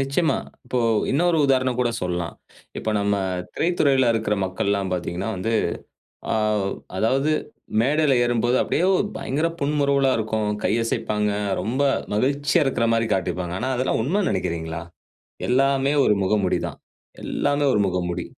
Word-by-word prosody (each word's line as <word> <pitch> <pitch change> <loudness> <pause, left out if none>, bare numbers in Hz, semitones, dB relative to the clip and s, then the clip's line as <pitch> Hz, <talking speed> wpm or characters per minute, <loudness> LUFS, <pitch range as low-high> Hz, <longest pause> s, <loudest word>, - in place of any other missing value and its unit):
நிச்சயமா. 140 +2 +1 0.3
இப்போ 125 0 -2 0.3
இன்னொரு 170 +4 +2
உதாரணம் 130 -2 +1
கூட 120 -1 +2
சொல்லாம். 90 -2 -2 0.4
இப்ப 110 - -2
நம்ம 100 0 +1 0.4
திரைத்துறையில 140 -7 +2
இருக்குற 110 -2 0
மக்கள்லாம் 100 +1 -1
பார்த்தீங்கன்னா 90 +3 -3
வந்து. 110 +5 -2 0.8
ஆ - - +1 0.6
அதாவது 135 +8 +1 0.5
மேடையில 145 +2 +3
ஏறும்போது 120 +1 +1
அப்டியே 180 +4 +1 0.3
பயங்கர 155 +5 -1
புன்முறுவலா 140 -2 +2
இருக்கும். 110 -1 -1
கையசைப்பாங்க, 105 -2 0 0.3
ரொம்ப 125 +6 -1 0.3
மகிழ்ச்சியா 140 +7 +2
இருக்கிற 125 -3 +1
மாரி 115 0 +2
காட்டிப்பாங்க. 90 -2 -2
ஆனா 130 - -2
அதெல்லாம் 130 -2 0
உண்மைன்னு 180 - 0
நெனைக்கிறீங்களா? 80 -1 -3 0.7
எல்லாமே 135 +2 +2
ஒரு 105 - +4
முகமுடி 95 -1 +1
தான். - - -8 0.5
எல்லாமே 145 0 0
ஒரு 105 - +2
முகமுடி. 90 -1 -2
120 Hz, 125 wpm, -23 LUFS, 100-140 Hz, 0.8 s, ஒரு